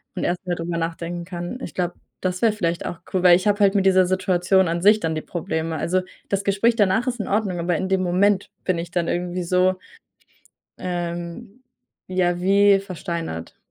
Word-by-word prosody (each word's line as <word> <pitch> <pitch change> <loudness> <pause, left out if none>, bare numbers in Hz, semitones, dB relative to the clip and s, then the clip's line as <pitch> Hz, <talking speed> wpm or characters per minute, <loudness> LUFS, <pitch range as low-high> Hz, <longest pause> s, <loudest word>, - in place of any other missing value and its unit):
und - - -3
erstmal 180 0 -1
drüber 170 0 -3
nachdenken 170 +1 -3
kann. 175 +6 -6
Ich - - -6
glaube, 175 -1 -1 0.3
das 185 -1 -2
wäre 230 - +4
vielleicht 170 -5 -2
auch 170 - -5
cool, 185 -1 +1
weil 180 -1 +8
ich 185 - -3
habe 205 0 +2
halt 195 -1 +5
mit 195 -1 +2
dieser 185 -1 +5
Situation 185 0 +2
an 170 +1 -1
sich 210 +3 +6
dann 160 -4 -1
die 155 - -2
Probleme. 160 -1 -3
Also, 185 +5 0 0.3
das 200 0 -1
Gespräch 205 +4 +2
danach 215 +3 +2
ist 245 -1 -2
in 205 - -5
Ordnung, 200 -4 0
aber 170 0 0
in 190 - -2
dem 190 -1 +2
Moment 190 +2 +2 0.2
bin 185 -2 +1
ich 170 0 -6
dann 175 -3 0
irgendwie 175 +1 -2
so, 185 +2 +2 1.0
ähm, 175 +5 -5 0.5
ja, 175 -1 0
wie 200 +2 +5
versteinert. 170 - -5
180 Hz, 195 wpm, -22 LUFS, 175-195 Hz, 1.0 s, weil